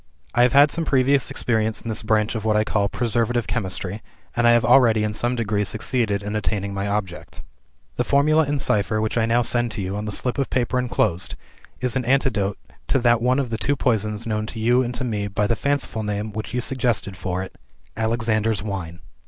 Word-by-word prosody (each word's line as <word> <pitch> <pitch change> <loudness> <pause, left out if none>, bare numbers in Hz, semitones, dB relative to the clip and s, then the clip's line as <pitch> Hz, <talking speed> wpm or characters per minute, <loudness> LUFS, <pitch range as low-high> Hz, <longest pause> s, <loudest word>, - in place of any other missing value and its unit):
I 120 - +3
have 125 0 +4
had 145 +1 +6
some 165 - -1
previous 135 -1 +2
experience 110 -2 0
in - - -10
this 110 -1 -1
branch 110 0 +1
of 110 -3 -4
what 110 -1 +2
I 105 - +3
call 100 -2 0
preservative 120 0 0
chemistry, 100 -2 -3 0.3
and 120 0 +3
I - - +7
have 120 -1 +3
already 115 -3 +5
in 105 0 -1
some 120 +3 0
degree 105 -3 0
succeeded 110 -1 0
in 105 +1 -4
attaining 100 -2 -2
my 100 +1 -2
object. 100 -4 -4 0.5
"The 125 - +2
Formula 150 +4 +3
in 145 +1 -1
cipher 105 -4 0
which 110 0 -1
I 115 -1 +2
now 120 +1 +2
send 120 +1 +1
to 105 - -4
you, 95 +2 -3
on 105 +1 -4
the 105 - -3
slip 125 +6 -1
of 135 - 0
paper 125 0 0
enclosed, 110 -7 -1 0.5
is 125 0 -1
an 130 -2 -1
antidote 115 -7 +1 0.3
to - - +2
that 120 -2 +3
one 125 +2 +2
of 135 -4 -1
the 110 - -2
two 145 - +1
poisons 110 -4 0
known 110 -1 -2
to 115 - -7
you 120 +3 +3
and 125 -1 -3
to - - -3
me 105 -5 -2
by 105 +1 -1
the 115 - +1
fanciful 140 -4 -1
name 105 0 -3
which 110 +1 -5
you 125 +1 -1
suggested 120 -6 -1
for 90 0 -3
it 95 - -10 0.4
'Alexander's 110 -2 0
Wine.' 90 -5 -5
110 Hz, 220 wpm, -22 LUFS, 105-125 Hz, 0.5 s, I